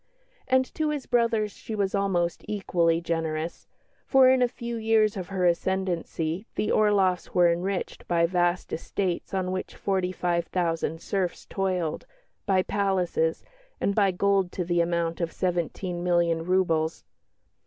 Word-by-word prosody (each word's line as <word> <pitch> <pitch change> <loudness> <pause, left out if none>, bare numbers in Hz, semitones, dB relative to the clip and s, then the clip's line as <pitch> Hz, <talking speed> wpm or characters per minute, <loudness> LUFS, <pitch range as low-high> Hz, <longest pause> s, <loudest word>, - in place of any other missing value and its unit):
And 260 0 +3
to 310 -1 0
his 295 -3 -3
brothers 230 -3 +1
she 220 - -7
was 200 -2 0
almost 190 -4 0
equally 170 -5 +1
generous, 165 -1 -3 0.4
for 265 -2 +6
in 260 0 +4
a 250 - +5
few 235 -1 -6
years 220 -1 +2
of 185 -3 -5
her 190 -2 -1
ascendancy 175 0 -1
the 210 - 0
Orloffs 195 -4 +2
were 175 -1 +5
enriched 180 +3 -3
by 170 -1 +3
vast 175 0 0
estates 180 +1 -2
on 185 -1 -1
which 185 0 -4
forty 190 -2 -1
five 175 -2 -1
thousand 165 -2 -1
serfs 190 -3 -2
toiled, 185 -5 -2 0.4
by 190 -2 +3
palaces, 185 -5 0 0.3
and 200 - +1
by 200 -1 +3
gold 195 0 +1
to 180 - -2
the 175 0 +2
amount 170 0 -1
of 165 -1 -1
seventeen 175 0 -2
million 170 -2 +2
roubles. 165 -3 +1
185 Hz, 145 wpm, -26 LUFS, 170-200 Hz, 0.4 s, for